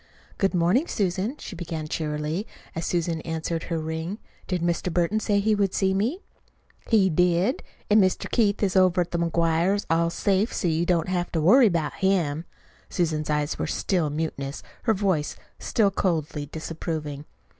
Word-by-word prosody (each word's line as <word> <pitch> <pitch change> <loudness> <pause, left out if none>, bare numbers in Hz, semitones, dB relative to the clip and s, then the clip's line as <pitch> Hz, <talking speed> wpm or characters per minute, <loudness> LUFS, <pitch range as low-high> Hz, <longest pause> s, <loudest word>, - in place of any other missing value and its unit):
"Good 195 -2 +2
morning, 180 - +3
Susan," 195 +6 -1
she 195 - -8
began 165 -3 -5
cheerily, 155 +5 -2 0.3
as 165 - -3
Susan 170 -2 -1
answered 160 0 -3
her 165 - -2
ring. 160 +4 -3 0.3
"Did 180 -3 -1
Mr. 175 +1 0
Burton 175 +5 +1
say 205 -2 +1
he 215 +2 +2
would 200 -2 +1
see 190 -1 +2
me?" 240 - -1 0.7
"He 210 -4 +5
did. 180 - +2 0.3
And 210 0 +5
Mr. 185 - 0
Keith 210 -3 +2
is 195 -2 +1
over 185 -1 +4
to 175 - -7
the - - +1
McGuires' 170 +4 +1
all 165 +1 +3
safe, 195 +5 +1
so - - -1
you 165 +1 +1
don't 170 -3 +2
have 175 -1 -1
to 165 - +1
worry 230 - +7
about 170 -6 0
him." 175 -5 0 0.4
Susan's 155 -4 -1
eyes 150 0 0
were - - -1
still 175 -6 0
mutinous, 145 -2 -4 0.3
her 220 - +4
voice 185 -7 0 0.2
still 205 -4 +2
coldly 155 -6 -1
disapproving. 155 -2 -5
175 Hz, 165 wpm, -25 LUFS, 160-195 Hz, 0.7 s, worry